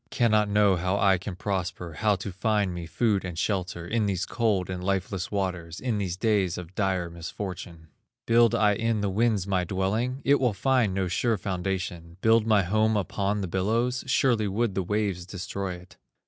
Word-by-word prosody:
Cannot 110 -4 +2
know 100 -2 +4
how 90 +3 0
I 95 -2 +3
can 95 0 -6
prosper, 90 -3 -3
How 105 +5 +2
to 100 +1 -6
find 100 0 0
me 85 -1 -6
food 105 +1 +1
and 90 -3 -6
shelter, 90 -3 -2
In 110 +1 0
these 95 -2 -1
cold 110 -6 0
and 90 -1 -5
lifeless 95 -1 -1
waters, 90 -4 -3
In 120 -5 -1
these 95 -3 -2
days 100 -4 +1
of 90 0 -8
dire 95 -3 0
misfortune. 85 0 -7 0.4
Build 115 -1 +4
I 105 -1 +4
in 110 0 0
the 100 -1 0
winds 110 -2 +1
my 95 -2 0
dwelling? 110 +9 -1
It 140 +1 +4
will 125 -4 +2
find 115 -1 +1
no 95 -1 0
sure 110 +5 +1
foundation. 90 -3 -4
Build 115 0 +4
my 105 -3 +4
home 110 +4 +2
upon 100 +1 -1
the 95 - -2
billows? 115 +8 0
Surely 120 -4 +2
would 105 +2 0
the 95 - 0
waves 100 -1 -1
destroy 95 -1 -4
it." 90 +1 -15
100 Hz, 185 wpm, -27 LUFS, 90-110 Hz, 0.4 s, know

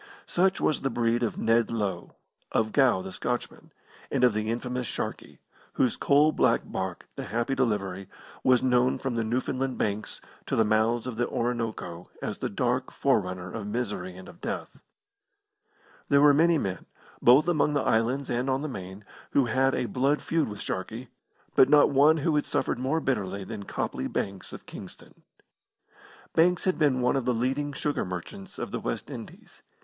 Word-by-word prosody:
Such 190 +2 +2
was 155 - +1
the 135 - 0
breed 120 0 +1
of 115 - -1
Ned 115 +1 +2
Low, 100 -6 -3 0.4
of 110 -1 +1
Gow 125 -9 +3
the 95 - -7
Scotchman, 120 +5 -4 0.4
and - - 0
of 125 -3 +5
the 110 +1 -1
infamous 125 +1 -2
Sharkey, - - -5 0.4
whose 125 - +2
coal 145 +2 +4
black - - +3
barque, - - -4
the - - -5
Happy 120 +6 -1
Delivery, 100 -7 -1 0.3
was 130 -2 +4
known 125 0 +3
from 135 -2 -3
the 115 -1 0
Newfoundland 130 +3 -1
Banks 105 0 -2 0.3
to - - 0
the 110 - +4
mouths 110 +2 +2
of 125 -3 -5
the 120 - +1
Orinoco 115 -8 -3
as - - -4
the - - -2
dark 125 +4 -1
forerunner 90 -8 0
of 110 -3 -5
misery 105 -5 -3
and 95 - -11
of 175 - -14
death. - - -5 1.3
There 140 - +5
were 145 -1 +7
many 165 +3 +4
men, 95 -9 -3 0.3
both 130 +7 +6
among 150 -3 +2
the 145 - +2
islands 125 +5 +1
and 125 +3 0
on 135 +2 0
the - - -2
Main, 95 -5 -8 0.3
who 140 - +4
had 130 +3 +2
a - - -1
blood 135 +5 +1
feud 165 -2 +1
with 105 - -7
Sharkey, 110 +6 -5 0.5
but 130 - +6
not 145 0 +6
one 145 +3 +5
who 155 +1 +1
had 150 - 0
suffered - - -1
more 135 +6 0
bitterly 100 -8 -1
than 100 0 -7
Copley 65 - -3
Banks, 95 -1 -4
of - - -10
Kingston. - - -11 1.1
Banks 175 +2 +3
had 185 -2 0
been 140 -5 +3
one 125 +3 +2
of 135 - -1
the 125 - +1
leading 135 +5 -1
sugar 145 +1 -1
merchants 90 +1 -7
of - - -5
the - - -2
West - - -4
Indies. - - -10
120 Hz, 180 wpm, -27 LUFS, 105-135 Hz, 1.3 s, were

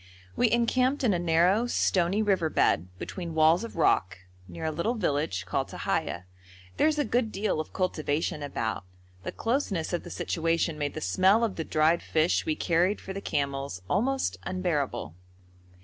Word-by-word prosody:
We 245 - +3
encamped 255 +4 +1
in 225 -5 +3
a 175 - 0
narrow, 175 +7 +3
stony 190 -2 +1
river 190 -6 +1
bed, 90 - +2
between 170 - -6
walls 160 +5 +4
of 230 - -7
rock, 95 - +2 0.3
near 85 - -7
a 160 - 0
little 170 +10 -1
village 145 - -1
called - - -1
Tahiya. 90 +1 -2 0.5
There - - +4
is 310 -1 +1
a 295 - +1
good 230 0 0
deal 205 -5 -1
of 155 - -4
cultivation 155 -4 -1
about. 115 -8 -3 0.4
The - - -5
closeness 225 - -1
of 175 - 0
the - - -10
situation 165 -1 -1
made 145 -1 -2
the - - -4
smell 190 - +3
of 220 -4 0
the 160 - -3
dried 160 +2 +2
fish 160 +2 +1
we 155 - +1
carried 175 +6 +1
for 190 - -7
the 195 - -5
camels 140 - -3
almost 265 +8 0
unbearable. 170 - -2
170 Hz, 170 wpm, -28 LUFS, 155-210 Hz, 0.5 s, walls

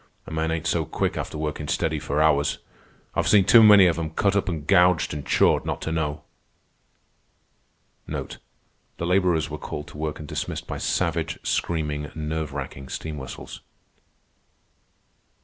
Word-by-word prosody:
A - - -10
man 80 0 -1
ain't 80 0 -2
so 80 0 +1
quick - - -2
after - - -4
workin' 75 -1 -3
steady - - 0
for 75 +2 0
hours. 70 -2 +2 0.6
I've - - 0
seen 100 -3 +5
too 115 - +8
many 105 -3 +8
of 85 -2 +2
'em 80 -1 -2
cut 100 -1 +2
up 100 -1 +1
an' 80 -4 -4
gouged 90 -1 +4
an' 75 - -4
chawed - - +3
not - - -3
to 80 - -3
know." 75 -2 -2 1.8
The 85 - -9
laborers 90 -4 +2
were 75 - -5
called 75 - -6
to 75 - -11
work 75 -1 -3
and 75 - -9
dismissed - - -4
by - - -5
savage, 80 -3 -1
screaming, 75 -3 -1
nerve 80 -1 -3
racking 70 -1 -7
steam 75 -2 -5
whistles. 65 - -9
80 Hz, 155 wpm, -24 LUFS, 75-85 Hz, 1.8 s, too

